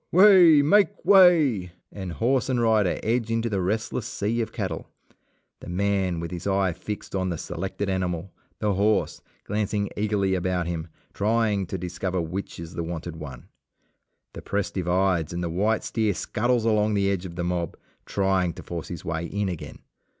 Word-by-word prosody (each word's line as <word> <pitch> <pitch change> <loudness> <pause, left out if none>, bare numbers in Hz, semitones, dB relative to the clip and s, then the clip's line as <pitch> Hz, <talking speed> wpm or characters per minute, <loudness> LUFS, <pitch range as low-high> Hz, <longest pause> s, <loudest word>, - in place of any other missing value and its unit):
Way! 180 -5 +7
make 205 +6 +3
way! 155 - +5 0.2
and 95 -4 -6
horse 130 +5 +1
and 125 -2 +1
rider 110 -5 +2
edge 115 +1 0
into 115 0 0
the 100 -2 0
restless 110 +4 -2
sea 115 -2 -1
of 110 0 -3
cattle, 95 -9 -4 0.7
the - - -10
man 95 -1 0
with 85 +1 -5
his 90 +1 -5
eye 95 -2 +1
fixed 105 +5 -7
on 95 -1 0
the 85 - -2
selected 95 +5 -4
animal, 90 -1 -2 0.3
the 105 -1 0
horse, 100 +1 +1 0.2
glancing 105 0 -1
eagerly 100 -2 0
about 90 -1 0
him, 85 -1 -4 0.3
trying 105 -2 +1
to 95 - -4
discover 90 +1 -3
which 85 +4 -4
is 85 0 -8
the - - -3
wanted 85 0 -5
one. 65 -6 -9 0.9
The - - -8
press 100 -1 -2
divides 90 -2 0
and 85 0 -3
the 85 - -2
white 105 +5 +1
steer 110 -4 0
scuttles 120 +4 0
along 105 -1 +2
the 100 -1 +2
edge 95 -1 -2
of 85 - -10
the 90 - -3
mob 85 -2 -2 0.3
trying 95 -3 +1
to - - -10
force 85 -2 -6
his 85 -3 -7
way 85 0 -2
in 100 +1 -2
again. 90 -4 -7
95 Hz, 175 wpm, -25 LUFS, 90-110 Hz, 0.9 s, Way